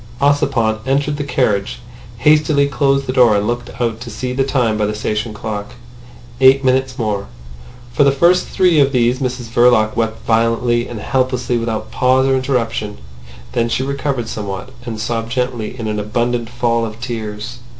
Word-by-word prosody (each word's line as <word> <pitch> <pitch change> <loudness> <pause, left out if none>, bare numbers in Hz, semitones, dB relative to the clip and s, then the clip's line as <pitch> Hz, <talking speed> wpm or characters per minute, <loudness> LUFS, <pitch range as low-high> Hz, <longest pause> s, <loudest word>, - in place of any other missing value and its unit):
Ossipon 140 -6 +2
entered 145 +2 0
the 145 - -2
carriage, 120 -6 0 0.4
hastily 150 +2 +3
closed 135 +1 +1
the 130 - -2
door 120 -5 +5
and 100 - 0
looked 120 +2 -3
out 115 -2 -1
to 120 - -7
see 125 +3 -4
the 135 +1 +1
time 125 -5 +1
by 105 -1 0
the 105 - -3
station 105 +1 -2
clock. 105 -1 -6 0.6
Eight 135 +1 +5
minutes 130 0 +1
more. 105 -5 -2 0.7
For 145 - +3
the 140 - +5
first 170 +6 +3
three 180 -4 +3
of 140 0 +3
these 125 0 +2
Mrs 125 -2 -3
Verloc 120 -3 +4
wept 115 -1 -2
violently 115 +1 +1
and 115 - -7
helplessly 125 +1 0
without 115 -1 -3
pause 130 +1 +3
or 135 - +2
interruption. 120 -5 -1 0.5
Then 115 - 0
she 130 - 0
recovered 140 -3 -2
somewhat, 100 0 -5 0.2
and 110 -2 -4
sobbed 115 +1 -3
gently 125 -2 -2
in 115 -3 -4
an 105 0 -2
abundant 120 +2 -1
fall 120 -1 0
of 110 0 -5
tears. 115 -1 -5
120 Hz, 170 wpm, -17 LUFS, 110-135 Hz, 0.7 s, door